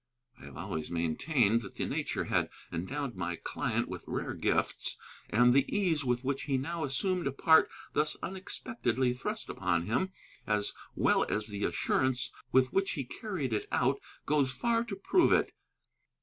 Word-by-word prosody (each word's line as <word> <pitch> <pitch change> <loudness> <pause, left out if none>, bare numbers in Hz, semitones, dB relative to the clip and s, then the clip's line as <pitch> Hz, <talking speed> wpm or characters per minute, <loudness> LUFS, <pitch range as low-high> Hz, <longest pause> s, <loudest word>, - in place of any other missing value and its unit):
I - - -10
have 70 0 -10
always 80 -3 -4
maintained 105 - +2
that 100 - -10
nature - - -1
had - - +1 0.2
endowed 125 - -3
my 85 -1 -2
client - - -2
with - - -6
rare - - -2
gifts; - - 0 0.3
and 120 +2 +5
the 135 +1 +5
ease 170 -7 +2
with 125 -1 0
which 135 +1 -1
he 135 -2 +1
now 165 +5 -3
assumed 175 +5 0
a - - 0
part 160 +4 +5 0.2
thus 150 0 +1
unexpectedly 155 - -1
thrust 125 - -4
upon 85 -3 0
him, 125 - 0 0.4
as 105 -1 +1 0.2
well - - +3
as 105 - 0
the 105 -1 -2
assurance 130 -2 +1 0.2
with 130 -1 +4
which 195 0 +2
he 140 - -2
carried 150 - -4
it 105 - -1
out, - - +2 0.3
goes 145 -3 +2
far 230 - +1
to 210 -4 -4
prove 345 - +3
it. - - +3
130 Hz, 165 wpm, -31 LUFS, 105-160 Hz, 0.4 s, and